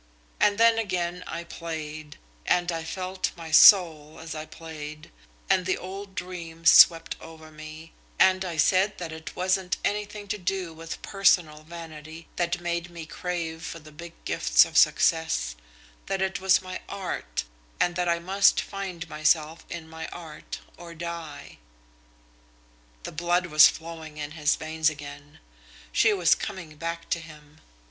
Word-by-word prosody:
And 205 -1 +3
then 230 0 +5
again 180 -4 -2
I 170 - -5
played, 155 -3 -7 0.3
and 175 0 +2
I 165 -1 -3
felt 185 +3 -3
my 165 -1 -8
soul 160 -4 +6
as 160 -1 -7
I 155 0 -6
played, 155 -1 -9 0.4
and 190 -1 +3
the 185 - +1
old 195 +1 -8
dreams 165 -2 0
swept 165 -1 +7
over 160 -1 -12
me, 155 +1 -11 0.2
and 190 0 +4
I 175 -3 -5
said 190 +6 +3
that 170 -3 -6
it 160 0 -8
wasn't 185 +1 0
anything 210 0 -3
to 210 - -2
do 185 -2 -2
with 165 +1 -8
personal 175 -6 +2
vanity 160 0 -10
that 175 0 0
made 175 0 -3
me 170 -2 -8
crave 165 -1 -4
for 165 - -6
the 155 -1 -14
big 170 +2 -10
gifts - - +4
of - - -11
success; 160 - +3 0.5
that 195 - -1
it 190 -1 -1
was 190 0 +3
my 185 0 -6
art, 175 - -4 0.4
and 175 0 +1
that 180 -1 0
I 170 - +2
must 195 +4 +3
find 190 -4 -5
myself 155 +1 0
in 165 -2 -7
my 160 0 -7
art 160 -3 -9 0.2
or 170 -1 -10
die." 165 - -7 1.4
The - - -6
blood 175 +3 0
was 155 -3 +8
flowing 160 -2 -7
in 150 -1 -5
his 150 -1 +1
veins 160 0 0
again. 145 -1 -10 0.5
She 225 - +4
was 180 -5 +4
coming 170 -5 -6
back 165 +1 -5
to 170 - +1
him. 155 -1 -14
165 Hz, 155 wpm, -26 LUFS, 155-180 Hz, 1.4 s, was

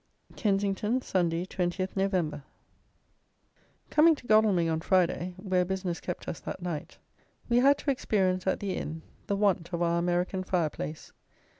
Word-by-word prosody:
Kensington, 205 +3 +1
Sunday, 175 -1 0
20th 185 0 -2
Nov. 185 -7 0 1.5
Coming 315 +2 +6
to 270 - -15
Godalming 215 -6 +4
on 160 0 0
Friday, 180 0 +1
where 185 -1 +1
business 185 -1 -3
kept 180 - -5
us - - -4
that - - -6
night, 170 -4 -5 0.5
we 240 - +2
had 275 +3 +5
to 285 - 0
experience 190 -7 0
at - - +1
the 195 -2 -2
inn 160 +1 -5 0.2
the 200 - 0
want 195 -4 +1
of 175 0 -1
our 170 0 +2
American 180 +2 0
fire 175 -5 0
place. 155 +1 -7
185 Hz, 150 wpm, -29 LUFS, 175-200 Hz, 1.5 s, Coming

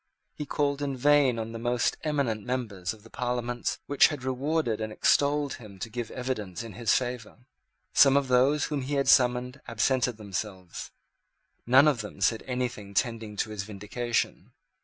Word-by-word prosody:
He 150 - -6
called 140 0 0
in 140 -2 -2
vain 145 -2 +4
on 115 0 -4
the 115 - -6
most 120 +1 +1
eminent 140 -9 -1
members 110 -8 -3
of 110 -2 -12
the 115 - -15
Parliaments 120 0 -2
which 145 - +5
had 145 -4 -6
rewarded 130 -3 -1
and 110 0 -3
extolled 145 +4 +2
him 105 -5 -12
to 110 +4 -6
give 120 -1 -4
evidence 115 -8 -4
in 115 -3 -9
his 115 +3 0
favour. 125 -1 -4 0.5
Some 135 0 +6
of 140 -1 +1
those 130 +4 +3
whom 145 -2 -2
he 140 +3 -3
had 140 -1 +1
summoned 125 +1 +3
absented 120 +1 +1
themselves. 95 -3 -6 0.8
None 135 +4 +7
of 135 -6 +2
them 105 -1 -9
said 105 +4 +2
anything 120 -6 -3
tending 115 -3 -1
to 110 +1 -2
his 105 -2 -3
vindication. 110 +4 -3
125 Hz, 170 wpm, -28 LUFS, 110-135 Hz, 0.8 s, None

